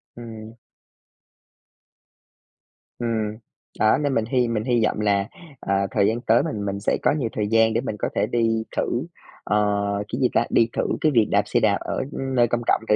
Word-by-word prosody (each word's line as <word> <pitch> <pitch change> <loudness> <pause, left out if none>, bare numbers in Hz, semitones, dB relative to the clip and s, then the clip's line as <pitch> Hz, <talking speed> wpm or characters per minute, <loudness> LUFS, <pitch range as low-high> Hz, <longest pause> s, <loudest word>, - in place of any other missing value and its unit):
Ừm. 115 -1 -10 2.4
Ừm. 110 -3 -2 0.4
Đó, 110 - +4
nên 145 -2 -1
mình 115 - +1
hy 125 +1 +1
mình 110 -2 -1
hy 120 -2 +1
vọng 105 - -1
là, 100 -1 +1 0.3
ờ, 100 0 0
thời 100 - +2
gian 115 +2 -1
tới 115 0 +3
mình 105 -1 -3
mình 100 0 -3
sẽ 100 - 0
có - - +3
nhiều 120 -6 -1
thời 105 -1 -1
gian 115 0 +3
để 115 - +1
mình 110 -5 -4
có - - -1
thể - - +2
đi 115 -1 +1
thử, - - 0 0.4
ờ, 105 0 +1 0.3
cái 125 - -2
gì 125 - +3
ta, - - +3
đi 115 - +3
thử - - 0 0.2
cái 155 - +3
việc 115 -5 +3
đạp 100 0 +3
xe - - +1
đạp 100 -2 +3
ở, - - -3
ưm, 135 0 -4
nơi 120 -1 +4
công 120 +1 -1
cộng - - +3
thử 105 - +5
110 Hz, 205 wpm, -23 LUFS, 105-120 Hz, 2.4 s, thử